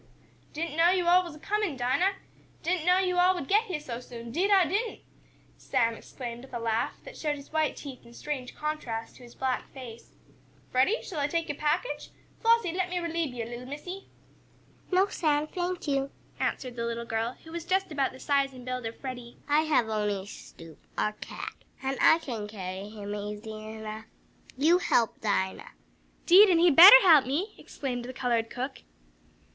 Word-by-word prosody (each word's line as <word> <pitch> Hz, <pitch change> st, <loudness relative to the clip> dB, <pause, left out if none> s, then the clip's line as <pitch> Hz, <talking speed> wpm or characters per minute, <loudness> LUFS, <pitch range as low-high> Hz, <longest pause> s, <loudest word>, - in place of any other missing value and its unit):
"Didn't 320 Hz, 0 st, -4 dB
know 335 Hz, +1 st, +6 dB
yo' 365 Hz, -1 st, +2 dB
all 360 Hz, +1 st, +5 dB
was 340 Hz, -4 st, -8 dB
a -, -, -13 dB
comin', 410 Hz, -4 st, -1 dB
Dinah! 260 Hz, +11 st, +2 dB, 0.5 s
Didn't 350 Hz, -1 st, -1 dB
know 360 Hz, 0 st, +6 dB
yo' 365 Hz, -1 st, +1 dB
all 365 Hz, +1 st, +5 dB
would 285 Hz, -7 st, -5 dB
get 425 Hz, +3 st, +3 dB
heah 360 Hz, -8 st, -3 dB
so 245 Hz, -6 st, -6 dB
soon, 235 Hz, -1 st, -9 dB
'deed 365 Hz, -, +1 dB
I 390 Hz, -3 st, +6 dB
didn't!" 415 Hz, +8 st, -2 dB, 0.6 s
Sam 230 Hz, -1 st, +1 dB
exclaimed, 240 Hz, +1 st, -8 dB
with 265 Hz, -, -10 dB
a -, -, -2 dB
laugh, 225 Hz, -1 st, 0 dB
that -, -, -11 dB
showed 300 Hz, -2 st, -2 dB
his 280 Hz, +1 st, -13 dB
white 315 Hz, -1 st, +1 dB
teeth 270 Hz, -3 st, -9 dB
in 235 Hz, -, -16 dB
strange 265 Hz, -3 st, -5 dB
contrast 280 Hz, -7 st, -4 dB
to -, -, -17 dB
his 240 Hz, -, -14 dB
black 260 Hz, -1 st, -2 dB
face. 235 Hz, -3 st, -11 dB, 0.6 s
"Freddie, 265 Hz, -, +2 dB
shall 335 Hz, -6 st, -5 dB
I 285 Hz, -, +1 dB
take 330 Hz, +1 st, -2 dB
yo' -, -, 0 dB
package? 305 Hz, -, -1 dB, 0.3 s
Flossie, 460 Hz, -7 st, +3 dB
let 365 Hz, 0 st, -1 dB
me 360 Hz, -, -2 dB
reliebe 335 Hz, -5 st, -2 dB
yo', 230 Hz, -2 st, -3 dB
little 240 Hz, +2 st, -8 dB
Missie!" 355 Hz, +8 st, -7 dB, 0.8 s
"No, 370 Hz, +1 st, +4 dB
Sam, 300 Hz, -6 st, 0 dB
thank 355 Hz, +1 st, -4 dB
you!" 275 Hz, -1 st, 0 dB, 0.3 s
answered 250 Hz, -2 st, -2 dB
the 235 Hz, -, -2 dB
little 235 Hz, 0 st, -4 dB
girl, 230 Hz, +1 st, -2 dB
who 320 Hz, -, -12 dB
was 340 Hz, 0 st, -5 dB
just 375 Hz, +1 st, 0 dB
about 280 Hz, -3 st, 0 dB
the 260 Hz, -, -13 dB
size 275 Hz, -1 st, +1 dB
and 250 Hz, -1 st, -11 dB
build 255 Hz, -2 st, -3 dB
of 225 Hz, -, -8 dB
Freddie. 245 Hz, -3 st, -7 dB
"I 295 Hz, +1 st, +4 dB
have 295 Hz, -7 st, +2 dB
only 210 Hz, -3 st, -1 dB
Snoop, 165 Hz, -5 st, -12 dB, 0.2 s
our 215 Hz, -, 0 dB
cat, -, -, -7 dB, 0.3 s
and 270 Hz, 0 st, -1 dB
I 320 Hz, -, +7 dB
can 235 Hz, -10 st, -5 dB
carry 195 Hz, -1 st, -6 dB
him 205 Hz, -1 st, -7 dB
easily 210 Hz, +1 st, -6 dB
enough. 220 Hz, 0 st, -7 dB, 0.5 s
You 325 Hz, +6 st, +4 dB
help 235 Hz, -9 st, +1 dB
Dinah!" 205 Hz, -, -1 dB, 0.5 s
"'Deed 385 Hz, +4 st, +8 dB
an' 350 Hz, -, +4 dB
he 335 Hz, -, +4 dB
had 330 Hz, -6 st, +5 dB
better 395 Hz, -, +12 dB
help 315 Hz, -8 st, +7 dB
me!" 345 Hz, +11 st, -1 dB
exclaimed 245 Hz, -3 st, -5 dB
the 255 Hz, -, -7 dB
colored 235 Hz, -3 st, 0 dB
cook. 260 Hz, +2 st, -5 dB
280 Hz, 195 wpm, -28 LUFS, 235-345 Hz, 0.8 s, better